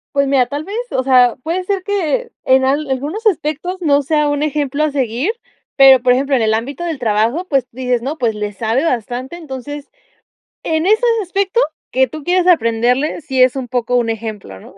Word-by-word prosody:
Pues 280 Hz, 0 st, +2 dB
mira, 270 Hz, -2 st, +3 dB
tal 285 Hz, +4 st, -5 dB
vez, 395 Hz, +5 st, -7 dB, 0.2 s
o 260 Hz, -, 0 dB
sea, 250 Hz, -2 st, +4 dB
puede 345 Hz, +5 st, -2 dB
ser 390 Hz, 0 st, -1 dB
que 405 Hz, +5 st, -2 dB
en 260 Hz, 0 st, +4 dB
al 285 Hz, +2 st, 0 dB
algunos 300 Hz, -, -3 dB
aspectos 355 Hz, -1 st, -1 dB
no 285 Hz, -3 st, +2 dB
sea 300 Hz, +1 st, +1 dB
un 290 Hz, +1 st, -1 dB
ejemplo 295 Hz, 0 st, -1 dB
a 305 Hz, -, 0 dB
seguir. 265 Hz, -, -1 dB, 0.4 s
Pero, 265 Hz, -2 st, +7 dB
por 250 Hz, -1 st, +5 dB
ejemplo, 275 Hz, +2 st, +1 dB
en 235 Hz, -, +1 dB
el 220 Hz, -, +2 dB
ámbito 260 Hz, +9 st, -3 dB
del 325 Hz, -5 st, -3 dB
trabajo, 230 Hz, -, 0 dB
pues 270 Hz, -4 st, +1 dB
dices: 250 Hz, -1 st, -2 dB
"No, 290 Hz, +4 st, -4 dB
pues 225 Hz, -3 st, 0 dB
le 210 Hz, 0 st, -4 dB
sabe 230 Hz, +8 st, -1 dB
bastante", 250 Hz, +4 st, -3 dB
entonces, 290 Hz, -1 st, -8 dB, 0.7 s
en 320 Hz, +1 st, -1 dB
esos 435 Hz, +4 st, +3 dB, 0.2 s
aspecto 390 Hz, +4 st, -1 dB, 0.3 s
que 260 Hz, 0 st, +2 dB
tú 305 Hz, +4 st, -9 dB
quieras 360 Hz, +1 st, +1 dB
aprenderle, 250 Hz, -1 st, +2 dB
sí 265 Hz, -3 st, -1 dB
es 255 Hz, +1 st, +4 dB
un 260 Hz, -2 st, -4 dB
poco 245 Hz, 0 st, -1 dB
un 235 Hz, -2 st, +1 dB
ejemplo, 210 Hz, -, -7 dB
¿no? -, -, -15 dB
270 Hz, 200 wpm, -17 LUFS, 245-315 Hz, 0.7 s, Pero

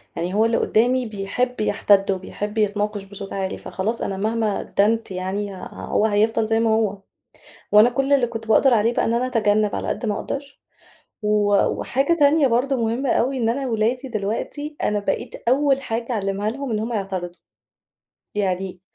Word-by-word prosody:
يعني 175 Hz, +3 st, -3 dB
هو 220 Hz, +2 st, +3 dB
اللي 230 Hz, 0 st, +2 dB
قُدّامي 245 Hz, +3 st, +2 dB
بيحب 220 Hz, +4 st, -2 dB
يحتَد، 200 Hz, -2 st, +3 dB
وبيحب 205 Hz, +3 st, -5 dB
يتناقش 210 Hz, -1 st, 0 dB
بصوت 195 Hz, 0 st, -9 dB
عالي، 190 Hz, -1 st, -3 dB
فخلاص 220 Hz, +5 st, -3 dB
أنا 195 Hz, -, -2 dB
مهما 215 Hz, 0 st, 0 dB
أدّنت 220 Hz, +1 st, 0 dB
يعني 190 Hz, +2 st, -3 dB, 0.2 s
هو 215 Hz, -, -1 dB
هيفضل 220 Hz, +1 st, +2 dB
زي 225 Hz, 0 st, +2 dB
ما 230 Hz, -1 st, +2 dB
هو. 220 Hz, -2 st, +1 dB, 0.8 s
وأنا 215 Hz, +3 st, +7 dB
كل 270 Hz, +3 st, 0 dB
اللي 265 Hz, -4 st, +4 dB
كُنت 225 Hz, -1 st, -7 dB
باقدر 245 Hz, +3 st, +5 dB
عليه 225 Hz, +1 st, +2 dB
بقى -, -, +1 dB
إن 225 Hz, -, 0 dB
أنا 245 Hz, +2 st, +1 dB
أتجنب 215 Hz, -4 st, +1 dB
على -, -, -3 dB
قد 225 Hz, -, -2 dB
ما 210 Hz, -, 0 dB
أقدر، 280 Hz, +6 st, -6 dB, 0.7 s
و 210 Hz, -, 0 dB, 0.4 s
وحاجة 275 Hz, +6 st, 0 dB
تانية 295 Hz, -2 st, +4 dB
برضه 255 Hz, +3 st, +1 dB
مهمة 235 Hz, +3 st, -1 dB
أوي 260 Hz, +4 st, +1 dB
إن 230 Hz, -3 st, +1 dB
أنا 265 Hz, +3 st, -1 dB
ولادي 240 Hz, +3 st, 0 dB
دلوقتي، 230 Hz, +8 st, -3 dB
أنا 210 Hz, 0 st, +1 dB
بقيت 230 Hz, +3 st, -3 dB
أول 275 Hz, +1 st, +3 dB
حاجة 230 Hz, -1 st, -3 dB
أعلّمها 200 Hz, 0 st, -1 dB
لهم 270 Hz, +2 st, -5 dB
إن 215 Hz, -, 0 dB
هُم 230 Hz, +2 st, -3 dB
يعترضوا، 190 Hz, -4 st, -3 dB, 1.0 s
يعني 190 Hz, -2 st, -2 dB
220 Hz, 170 wpm, -22 LUFS, 205-245 Hz, 1.0 s, وأنا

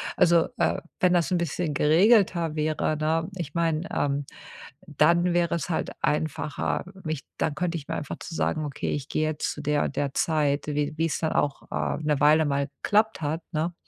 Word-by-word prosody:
Also, 170 Hz, -1 st, +4 dB
äh, -, -, +1 dB, 0.2 s
wenn 180 Hz, -1 st, +4 dB
das 175 Hz, 0 st, +2 dB
'n 180 Hz, -, +3 dB
bisschen 170 Hz, -1 st, -2 dB
geregelter 170 Hz, -, +4 dB
wäre, 155 Hz, 0 st, 0 dB
ne, 160 Hz, +2 st, 0 dB
ich 165 Hz, -6 st, -5 dB
mein, 165 Hz, -1 st, 0 dB
ähm, 140 Hz, 0 st, 0 dB, 0.6 s
dann 170 Hz, +2 st, +3 dB
wäre 170 Hz, -1 st, +2 dB
es 170 Hz, -, -4 dB
halt 165 Hz, -, -1 dB
einfacher, 150 Hz, -1 st, -1 dB, 0.2 s
mich 155 Hz, -3 st, -3 dB
dann 150 Hz, -3 st, -1 dB
könnte 170 Hz, +1 st, -1 dB
ich 145 Hz, -, -10 dB
mir -, -, -3 dB
einfach 145 Hz, -, -5 dB
zu 165 Hz, -, -8 dB
sagen: 155 Hz, -1 st, 0 dB
„Okay, 145 Hz, -, -4 dB
ich 145 Hz, -2 st, -3 dB
gehe 155 Hz, -, -1 dB
jetzt 155 Hz, -1 st, -2 dB
zu 150 Hz, -, -8 dB
der 150 Hz, 0 st, +1 dB
und -, -, -3 dB
der 140 Hz, -1 st, -1 dB
Zeit", 150 Hz, -3 st, +1 dB
wie 150 Hz, 0 st, 0 dB
wie 165 Hz, -, +2 dB
es 165 Hz, -, -1 dB
dann 160 Hz, -, 0 dB
auch, 145 Hz, -1 st, 0 dB
äh, -, -, -1 dB
'ne 150 Hz, -2 st, +1 dB
Weile 155 Hz, +2 st, +5 dB
mal 140 Hz, -1 st, 0 dB, 0.2 s
geklappt 215 Hz, -2 st, +2 dB
hat, 155 Hz, +3 st, -2 dB
ne. 160 Hz, +3 st, -1 dB
155 Hz, 200 wpm, -26 LUFS, 150-170 Hz, 0.6 s, Weile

